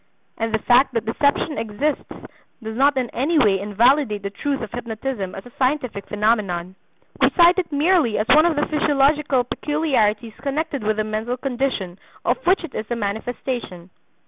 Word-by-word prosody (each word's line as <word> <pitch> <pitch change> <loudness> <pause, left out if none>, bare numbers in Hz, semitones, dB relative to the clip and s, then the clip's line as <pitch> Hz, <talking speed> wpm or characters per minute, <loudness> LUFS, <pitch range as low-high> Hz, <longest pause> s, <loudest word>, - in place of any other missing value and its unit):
And 225 0 -1
the 220 - +2
fact 245 +3 +3
that 230 - -1
deception 285 +6 0
exists 230 +8 -2 0.5
does 220 0 -5
not 275 +2 +3
in 250 -2 -1
any 290 +7 0
way 200 -9 +4
invalidate 210 +2 +2
the 200 - -4
truth 275 +7 -2
of 220 -3 -6
hypnotism 230 -4 -4
as 195 - -9
a 245 - -13
scientific 255 -6 -1
phenomenon. 205 -5 0 0.5
We - - +6
cite 350 +1 +5
it 350 -4 -3
merely 295 - +2
as 215 - -1
one 310 +4 +6
of 335 - 0
the 295 - +1
physiological 290 -3 +2
peculiarities 240 -7 0
connected 285 +1 -2
with 215 0 0
the 215 - +1
mental 215 +3 -3
condition 245 -9 -3 0.3
of - - 0
which 370 0 +3
it 330 - -8
is 215 - -5
a 240 - -1
manifestation. 215 -3 -4
245 Hz, 170 wpm, -21 LUFS, 215-290 Hz, 0.5 s, We